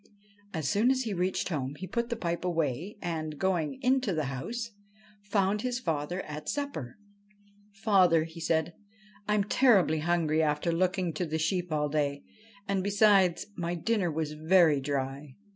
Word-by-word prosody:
As 160 -5 -3
soon 215 - +3
as 260 0 +2
he 220 -4 -3
reached 185 +1 -1
home 140 -4 -3
he 185 - -7
put 235 +5 -2
the 235 - -1
pipe 170 -6 -3
away, 165 - -2
and, 155 -3 -3
going 185 - 0
into 255 -6 +2
the 155 - 0
house, 230 - -4 0.5
found 205 0 0
his 250 0 -2
father 165 - -2
at 150 0 -6
supper. 280 - -4 0.4
' 205 0 -31
Father,' 180 -7 +4
said 160 -1 -1
he, - - -18 0.3
' 210 -1 -27
I 210 - +3
am 205 - +2
terribly 200 -8 +4
hungry 160 -1 +1
after 150 +2 +1
looking 180 0 0
to 180 - -2
the 160 +1 -2
sheep 175 +2 -1
all 150 -1 +1
day; 145 -1 -1 0.4
and, 195 -2 0
besides, 200 -4 +4
my 175 0 -2
dinner 195 +1 0
was 155 -1 -2
very 160 -1 +4
dry.' 135 0 -3
175 Hz, 170 wpm, -29 LUFS, 155-205 Hz, 0.5 s, Father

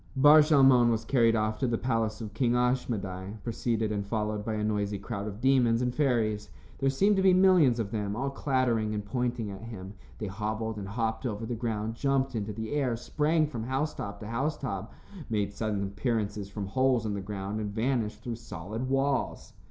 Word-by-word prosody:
Bar 145 +3 +8
Shalmon 135 -5 +6
was 115 -1 0
carried 115 -3 +3
off 110 0 0
to 130 - +1
the 120 -1 0
palace 115 -3 -1
of 105 -2 -6
King 120 +2 +1
Ashmedai, 110 -6 -1
preceded 115 -2 -1
and 100 -1 -1
followed 105 0 -2
by 110 0 -2
a 105 - -2
noisy 105 -1 -1
crowd 100 0 -5
of 105 0 -6
demons 125 -3 +3
and 125 0 0
fairies. 115 -8 +1 0.3
There 135 0 +2
seemed 195 +9 +3
to - - +3
be 190 -1 +5
millions 180 -10 +5
of 105 -3 -2
them, 105 -2 -2
all 135 +4 -2
clattering 125 -6 0
and 105 -1 -4
pointing 120 -1 -2
at 95 - -8
him. 100 -4 -8 0.2
They 110 - -4
hobbled 110 +2 -3
and 100 -2 -5
hopped 110 +3 -2
over 110 -1 -4
the 120 - -3
ground, 110 -2 -2
jumped 135 +2 0
into 105 -2 -2
the 110 +1 -5
air, 135 -5 +1
sprang 155 +6 +1
from 120 -7 -5
housetop 130 -6 -3
to 105 - -6
housetop, 115 -4 -3 0.4
made 100 -3 -1
sudden 105 -1 -2
appearances 105 -1 -2
from 100 0 -5
holes 125 +2 +2
in 105 - -1
the 100 - -3
ground 100 +1 -4
and 105 -1 -3
vanished 110 0 -1
through 120 -2 -4
solid 110 +3 -6
walls. 135 0 0
115 Hz, 195 wpm, -29 LUFS, 105-130 Hz, 0.4 s, Bar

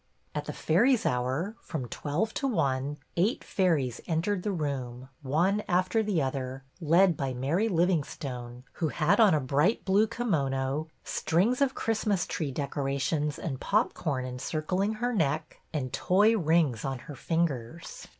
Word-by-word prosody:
At - - -3
the - - -4
Fairies' 235 +9 +2
Hour, 130 - 0
from 135 -6 -5
twelve 155 - -2
to 275 - -1
one, 145 - 0 0.2
eight 200 +8 +1
fairies 155 - 0
entered 180 +4 0
the 210 - -1
room, 130 -6 -4
one 170 +9 +1
after 185 +4 +2
the 200 -8 +1
other, 130 0 -3 0.2
led 170 +3 +4
by 135 -2 -3
Mary 160 - +1
Livingstone, 140 - -1 0.2
who 160 - +3
had 155 - +2
on 210 -7 +6
a - - +2
bright 145 - +1
blue 200 +3 +4
kimono, 150 - -1 0.2
strings 215 - +1
of 270 -1 +2
Christmas 215 -4 0
tree 150 -4 -3
decorations 140 +1 -1
and 135 -6 -4
pop 215 +4 +2
corn 135 -6 -2
encircling 155 +10 -1
her 240 +3 -1
neck, 155 -5 -1
and 130 -5 -3
toy 205 +5 +4
rings 160 - +2
on 135 -1 -2
her 150 - -8
fingers. 165 -1 -3
160 Hz, 150 wpm, -29 LUFS, 135-195 Hz, 0.2 s, on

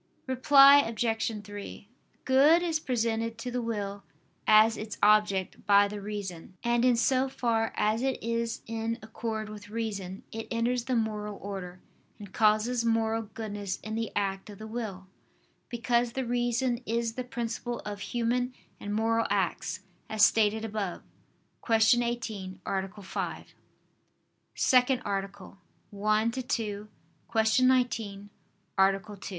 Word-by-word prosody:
Reply 275 +2 +7
Obj. 225 -2 0
3: 205 0 -9 0.4
Good 290 +6 +5
is 325 -3 0
presented 230 -4 -1
to 245 +2 -5
the 245 0 -1
will 205 -3 -3 0.5
as 215 +1 +6
its 215 -1 -6
object 210 -3 +3
by 200 0 +6
the 205 0 -6
reason: 195 -3 -6
and 235 0 +2
in 250 -1 +5
so 260 +3 +2
far 230 -3 0
as 215 +2 +1
it 265 0 0
is 230 0 -2
in 225 0 -3
accord 220 -1 -4
with 210 0 -10
reason, 205 -4 -4
it 225 0 -6
enters 235 +1 0
the 260 -1 0
moral 210 -2 -2
order, 185 -2 -7 0.4
and 200 -2 -11
causes 220 +3 +2
moral 225 -1 +1
goodness 205 -3 -4
in 215 - -5
the 225 0 -2
act 195 0 -2
of 205 - -10
the 215 - -8
will: 215 -4 -5 0.6
because 240 0 0
the 265 -1 -2
reason 240 +1 0
is 230 0 -1
the 255 - -4
principle 240 0 -4
of 205 -1 -5
human 245 +3 -1 0.2
and 205 0 -4
moral 225 +1 +1
acts, - - -1 0.3
as 215 -1 +5
stated 220 0 +2
above 205 -4 -4 0.6
(Q. 225 +1 +4
18, 215 -6 -4
A. 195 +1 -3
5). 190 - -4
________________________ - - -25 1.1
SECOND 255 0 +3
ARTICLE 195 -1 -5 0.4
[I 215 0 +3
II, 260 - -2
Q. 210 -2 -2 0.7
19, 235 -6 +1 0.5
Art. 195 +1 +1
225 Hz, 135 wpm, -29 LUFS, 205-240 Hz, 1.1 s, Reply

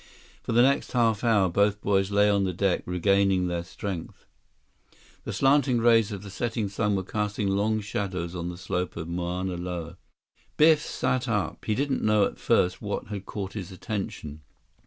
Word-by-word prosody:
For - - -4
the 120 +2 +5
next 140 +2 +1
half 115 -3 +2
hour, 110 -5 +4
both 100 +3 +2
boys 95 -1 +1
lay 105 0 +4
on 100 -1 +2
the 95 -1 -1
deck 95 0 +1
regaining 95 +1 +2
their 85 -1 -2
strength. 90 -1 -7 1.0
The - - -3
slanting 135 -2 +3
rays 115 -2 +4
of 100 -1 -6
the 100 - -9
setting 115 0 -2
sun 105 +1 0
were 95 - -1
casting 105 0 -2
long 105 +3 +1
shadows 95 -4 -3
on 85 -1 -4
the 90 - -7
slope 90 -1 -3
of 85 - -4
the 85 - -6
Mauna 90 +1 -2
Loa. 85 -1 -5 0.6
Biff 155 0 +6
sat 130 -3 -1
up. 105 -4 -2
He 110 - 0
didn't 140 +2 0
know 105 -1 +3
at - - -5
first 90 +1 +2
what 105 -1 -4
had 100 -2 -6
caught 100 -2 -5
his 100 -3 -6
attention. 95 -7 -5
100 Hz, 180 wpm, -26 LUFS, 90-110 Hz, 1.0 s, Biff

